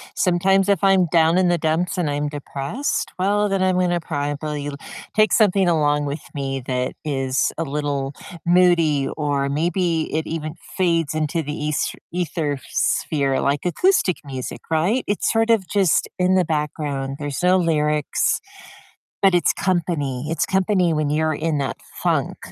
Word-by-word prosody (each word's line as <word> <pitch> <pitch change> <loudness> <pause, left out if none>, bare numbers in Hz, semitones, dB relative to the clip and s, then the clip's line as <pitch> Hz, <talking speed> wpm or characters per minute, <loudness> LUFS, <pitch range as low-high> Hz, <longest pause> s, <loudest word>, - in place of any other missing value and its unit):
Sometimes 190 +2 +2
if 195 -4 +2
I'm 190 -2 +4
down 165 0 +4
in 185 -1 +3
the 175 - +2
dumps 165 +4 0
and 170 -5 0
I'm 145 +1 -1
depressed, 145 - -3
well, 205 +2 +1
then 195 -1 0
I'm 185 -1 +2
gonna 175 -1 +1
probably 145 -1 -3 0.5
take 215 0 +4
something 200 -4 +4
along 150 -3 +2
with 145 +2 -4
me 135 -2 -3
that 125 0 -1
is 135 -3 0
a 165 - -1
little 145 -2 -2 0.3
moody, 170 -5 +3
or 145 -2 0
maybe 165 +2 0
it 160 0 -1
even 155 -1 -4 0.2
fades 170 -5 +1
into 155 +1 -1
the 150 0 -4
es 150 - -1 0.2
ether 160 -5 -2
sphere, 140 -3 0
like, 140 +2 0
acoustic 190 - +2
music, 130 -3 -6
right? 180 +11 +1
It's 205 - 0
sort 225 0 +2
of 220 -5 +3
just 195 -5 +2
in 185 +1 +2
the 185 -1 +3
background. 145 -3 -2
There's 145 +2 -4
no 180 +1 +5
lyrics, 150 -4 +1 0.8
but 195 -2 +5
it's 175 - +3
company 155 -7 -1
it's 165 - 0
company 190 -3 +2
when 150 -1 0
you're 155 +1 +1
in 155 0 -1
that 140 - -2 0.3
funk, - - 0
160 Hz, 155 wpm, -21 LUFS, 145-180 Hz, 0.8 s, no